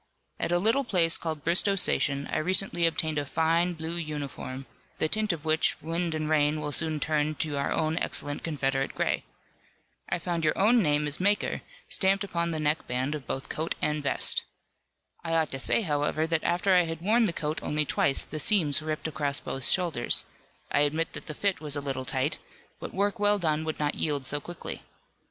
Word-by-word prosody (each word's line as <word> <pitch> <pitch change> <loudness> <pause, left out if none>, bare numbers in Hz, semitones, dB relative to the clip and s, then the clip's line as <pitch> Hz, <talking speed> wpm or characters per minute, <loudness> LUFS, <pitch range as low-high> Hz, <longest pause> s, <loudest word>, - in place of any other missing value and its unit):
At - - -1
a 175 - +4
little 225 +9 +2
place 175 -8 +3
called 155 -3 -4
Bristoe 185 +4 +3
Station 140 -6 +2
I - - +2
recently 175 0 +2
obtained 160 -2 -1
a - - -2
fine, 165 +3 +1
blue 165 +1 -4
uniform, 145 -4 -5 0.3
the 155 - +2
tint 215 +4 +1
of 165 -2 -6
which 155 0 +2
wind 165 0 -2
and 155 -1 -2
rain 150 0 +2
will 150 -1 -3
soon 155 +1 -1
turn 155 0 0
to 150 -1 -2
our 140 - -1
own 160 +1 0
excellent 145 0 -3
Confederate 135 -4 -1
gray. - - 0 0.8
I - - 0
found 170 -1 -3
your 155 - +1
own 225 +4 +5
name 150 -3 +2
as 145 0 +1
maker 205 +2 +1 0.3
stamped 195 +1 +2
upon 170 -3 -1
the 160 -2 -2
neck 150 +1 0
band 130 +4 -1
of 145 -5 -6
both 135 - -4
coat 160 +2 -3
and 150 0 -1
vest. 140 - +1 0.8
"I 165 -1 -2
ought 160 -2 +1
to 135 - -4
say 225 - +3
however 150 -1 0
that 160 -1 -1
after 185 +3 +2
I 180 -1 +5
had 165 0 -5
worn 225 +5 +3
the 195 - +2
coat 155 -2 -3
only 150 0 0
twice 135 - +2
the 155 - -6
seams 155 -5 +3
ripped 155 0 -3
across 145 -2 0
both 135 -1 -2
shoulders, 170 -10 +2 0.5
I - - +2
admit 155 +3 +1
that - - -6
the 155 - -4
fit 200 0 -1
was 150 -2 -2
a - - 0
little 135 -2 -3
tight, 130 +3 -1 0.4
but - - -6
work 200 +3 -1
well 205 0 +4
done 155 -4 0
would 155 - -3
not 145 -1 0
yield 145 -3 -2
so 145 +3 0
quickly. 175 +2 -7
155 Hz, 200 wpm, -28 LUFS, 145-175 Hz, 0.8 s, own